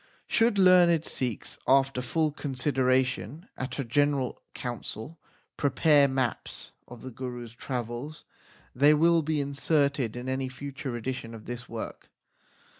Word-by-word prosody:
Should 225 -2 +2
learned 175 -4 +6
Sikhs, 125 -4 -3
after 135 -1 +3
full 155 +4 0
consideration 130 - 0
at 130 -1 -5
a 140 - -1
general 140 +1 0
council, 120 +4 -6 0.4
prepare 145 +1 +4
maps 130 -3 -3 0.2
of 120 -2 -11
the 130 - -7
Gurus 120 -1 -7
travels, 125 +4 -5 0.5
they 145 +4 +5
will 165 +2 +4
be 155 0 -1
inserted 140 -3 0
in 125 +1 -6
any 130 0 -1
future 135 -1 -6
edition 115 -1 -5
of 110 - -11
this 120 +1 -7
work. 115 -1 -7
130 Hz, 125 wpm, -28 LUFS, 125-150 Hz, 0.5 s, learned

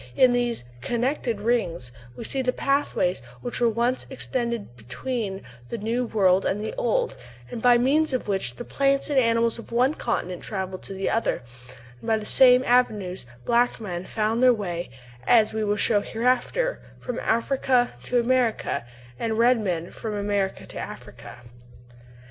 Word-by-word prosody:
In 255 -1 +6
these 240 - 0 0.2
"connecting 240 - -1
ridges" 175 - 0 0.2
we - - -7
see 265 +4 -1
the 250 -1 +1
pathway 275 -10 +1 0.3
which 245 - -4
once 235 +2 +1
extended 235 - -3
between 195 - -4 0.3
the - - -3
New 230 +4 -1
World 195 -3 +3
and 200 - 0
the 215 - -4
Old, - - 0 0.4
and 230 - -5
by 245 0 +6
means 285 +6 +2
of 255 -4 -2
which 190 -12 -1
the - - -7
plants 275 +1 +1
and 275 - +4
animals 230 -1 +2
of 230 - -11
one 250 +5 +3
continent 185 - -3
travelled 190 -2 -4
to - - -7
the 195 - -1
other; 225 - 0 0.6
and - - -11
by 220 -1 +3
the 215 - -6
same 250 +2 +6
avenues 210 - +1 0.2
black 240 +1 +2
men 180 -5 -5
found 220 +2 0
their 255 -1 +6
way, 175 -5 -4 0.4
as 220 -3 +5
we 220 0 -1
will 205 0 +1
show 205 0 +2
hereafter, 255 - 0 0.2
from 250 0 -4
Africa 245 +1 +1
to 245 - +1
America, 235 - 0 0.3
and 220 -1 -1
red 240 +1 +4
men 175 -5 -2
from 220 -2 -5
America 200 -1 -1
to - - -8
Africa. 120 - -9
230 Hz, 160 wpm, -25 LUFS, 205-250 Hz, 0.6 s, In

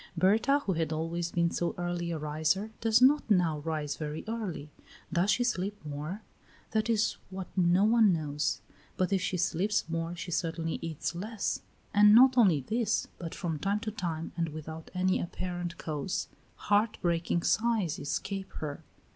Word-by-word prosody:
Berta, 225 +11 +3
who 190 - +1
had 165 -2 -1
always 165 +2 -2
been 170 -1 +1
so 175 - -1
early 175 -1 -2
a 165 - -2
riser, 155 +8 0
does 225 +2 +4
not 285 -1 +5
now 175 -7 +3
rise 150 -1 -3
very 155 0 -4
early. 200 -10 -4 0.4
Does 175 +3 +2
she 245 - +3
sleep 205 -4 -1
more? 150 +8 -5 0.5
That 220 +1 0
is 220 -1 +2
what 190 -1 -7
no 180 +1 +4
one 220 -1 +5
knows, 150 -3 -1 0.4
but 185 +1 +1
if 190 - +2
she 180 - -1
sleeps 185 +4 0
more 165 +1 -3
she 175 +1 -6
certainly 165 -1 -2
eats 160 0 -3
less; 205 +4 -3 0.3
and 210 +1 +7
not 260 +2 +8
only 190 - +5
this, 225 - 0
but 165 -2 -6
from 165 -5 -3
time 200 +5 0
to 220 - -3
time, 170 -6 -4
and 165 -1 -1
without 155 +1 -8
any 185 0 +2
apparent 175 -1 -4
cause, 155 +2 -3 0.3
heart 210 +2 +1
breaking 170 0 +1
sighs 215 -8 +1
escape 190 +6 -3
her. 145 -2 -5
175 Hz, 165 wpm, -30 LUFS, 160-210 Hz, 0.5 s, not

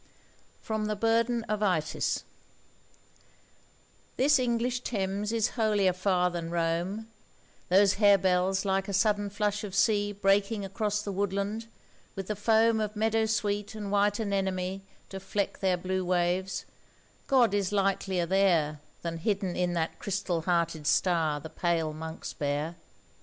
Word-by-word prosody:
FROM 220 -1 -2
'THE 215 - -1
BURDEN 230 +2 +1
OF 215 -1 -3
ITYS' 180 -7 0 1.9
THIS 280 +1 +4
English 245 0 0
Thames 205 -3 -2
is 225 -2 +1
holier 210 -5 +2
far 180 -1 +1
than 170 -1 -4
Rome, 175 +6 -1 0.6
Those 195 +2 +4
harebells 190 -2 +3
like 195 0 0
a 200 - -4
sudden 205 +1 +2
flush 205 +1 -1
of 195 -2 -6
sea 205 0 +2
Breaking 200 +1 +1
across 210 +2 -2
the 205 - -4
woodland, 200 +3 -2 0.5
with 195 -1 -4
the 210 - -1
foam 220 +2 +3
Of 215 0 -2
meadow 220 +1 +1
sweet 210 -1 -1
and 205 -2 -5
white 205 0 +2
anemone 190 -2 -1 0.3
To 195 - -6
fleck 195 +1 -3
their 185 -2 +1
blue 185 +1 -2
waves,—God 185 +6 -1
is 200 -2 0
likelier 195 -3 0
there 170 -5 +2 0.2
Than 165 -1 -3
hidden 195 -1 -1
in 180 -1 0
that 165 -1 -2
crystal 190 -4 -2
hearted 170 -3 0
star 165 -6 +2
the 155 - -8
pale 165 -3 0
monks 160 +1 -7
bear! 145 +3 -2
195 Hz, 135 wpm, -29 LUFS, 180-210 Hz, 1.9 s, THIS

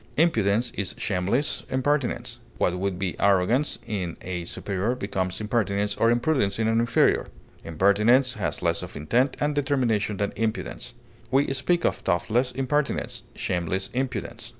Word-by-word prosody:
Impudence 115 -8 +2
is 100 - -3
shameless 100 +9 0
impertinence. 135 0 -1 0.2
What 90 0 +1
would 95 -1 -1
be 95 -1 -2
arrogance 100 +9 +2
in 95 -5 -3
a 90 -2 -4
superior 100 +6 -2
becomes 95 -5 -2
impertinence 105 -2 0
or 115 - +3
impudence 120 -3 +1
in 110 -1 +1
an 115 0 +3
inferior. 115 0 +3 0.4
Impertinence 105 - +3
has 105 -5 -3
less 85 -1 +1
of 90 0 -8
intent 125 - +1
and 145 0 +1
determination 125 -8 0
than 100 0 -1
impudence. 110 0 -3 0.3
We 135 +1 +2
speak 175 +5 +1
of - - +2
thoughtless 120 +8 0
impertinence, 140 +2 -1
shameless 90 +2 -2
impudence. 125 -4 -3
110 Hz, 140 wpm, -25 LUFS, 95-130 Hz, 0.4 s, or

